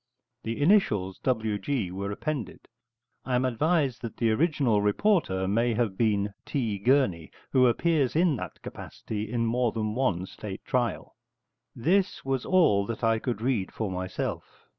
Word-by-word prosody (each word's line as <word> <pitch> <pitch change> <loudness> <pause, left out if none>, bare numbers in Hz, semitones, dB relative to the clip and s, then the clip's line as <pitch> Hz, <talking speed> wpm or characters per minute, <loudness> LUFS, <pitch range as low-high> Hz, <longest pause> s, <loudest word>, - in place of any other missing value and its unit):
The 115 0 -4
initials 130 - +2
W. 110 -5 0
G. 120 -10 -2
are 100 +2 -4
appended; 135 - -4 0.6
I 130 - -1
am 125 +1 +2
advised 140 +1 +1
that 115 - -7
the 115 -2 +2
original 135 -5 +2
reporter 105 - +1
may 115 +3 +1
have 110 -4 0
been 105 -2 +1
T. 115 -8 -2
Gurney, 100 - +2 0.2
who 130 -2 +5
appears 145 +1 +1
in 165 -2 +3
that 90 -5 -8
capacity 110 0 -6
in 115 -1 0
more 120 0 +1
than 110 -1 -2
one 110 -8 0
State 100 0 -8
trial. 120 -4 -1 0.6
This 185 +9 +1
was 135 -2 -1
all 105 - +4
that 115 0 -5
I 115 -1 +3
could 120 -3 -3
read 120 -7 0
for 110 -4 -3
myself. 95 0 -5
115 Hz, 155 wpm, -27 LUFS, 100-135 Hz, 0.6 s, who